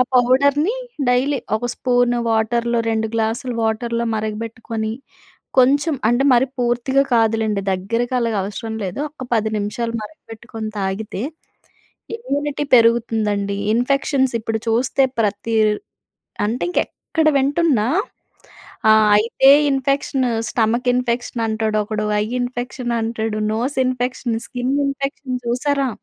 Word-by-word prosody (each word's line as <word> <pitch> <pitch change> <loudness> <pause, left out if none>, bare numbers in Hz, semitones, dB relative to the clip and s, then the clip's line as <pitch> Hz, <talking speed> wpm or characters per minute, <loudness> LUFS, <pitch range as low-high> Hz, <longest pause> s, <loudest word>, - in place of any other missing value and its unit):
ఆ - - +8
పౌడ‌ర్‌ని 280 - +3 0.3
డైలీ 260 +3 +2 0.2
ఒక 240 +3 -3
స్పూన్ 245 -1 +2 0.2
వాటర్‌లో, 235 +2 +1
2 220 0 0
గ్లాసులు 230 +3 -1
వాటర్‌లో 235 +1 -1
మరగబెట్టుకొని 220 +1 -4 0.7
కొంచెం 280 +5 +4
అంటే, 240 +3 +2
మరి 245 +1 +4
పూర్తిగా 245 +3 +1
కాదులెండి 220 -2 +1
దగ్గరకి 230 +7 -2
అలాగా 230 -3 0
అవసరం 210 +3 -5
లేదు. 185 +5 -4
ఒక్క 285 -3 -10
10 220 -1 +1
నిమిషాలు 230 +3 -3
మరగబెట్టుకొని 225 -3 -8
తాగితే, 195 +1 -3 0.9
ఇమ్యూనిటీ 295 - -2
పెరుగుతుందండి. 220 -4 +2 0.2
ఇన్ఫెక్షన్స్ 265 +2 +1
ఇప్పుడు 220 0 -2
చూస్తే 245 +4 +2 0.2
ప్రతి 210 +2 -1 0.9
అంటే 225 +4 -2
ఇంక - - +1
ఎక్కడ 320 0 -3
వింటున్నా 275 -5 +2 1.0
ఆహ్, 215 0 +6
అయితే 230 +5 +4 0.2
ఇన్ఫెక్షన్, 275 0 0 0.3
స్టమక్ 235 +2 0
ఇన్ఫెక్షన్ 245 -1 -1
అంటాడు 220 -1 -1
ఒకడు. 215 0 -3 0.2
ఐ - - +1 0.2
ఇన్ఫెక్షన్ 245 0 -3
అంటాడు. 225 -1 -2
నోస్ 240 +6 -1
ఇన్ఫెక్షన్, 250 -2 -1
స్కిన్ 250 +2 -2
ఇన్ఫెక్షన్ 275 -1 -3
చూసారా? 275 +3 0
235 Hz, 115 wpm, -20 LUFS, 220-260 Hz, 1.0 s, ఆ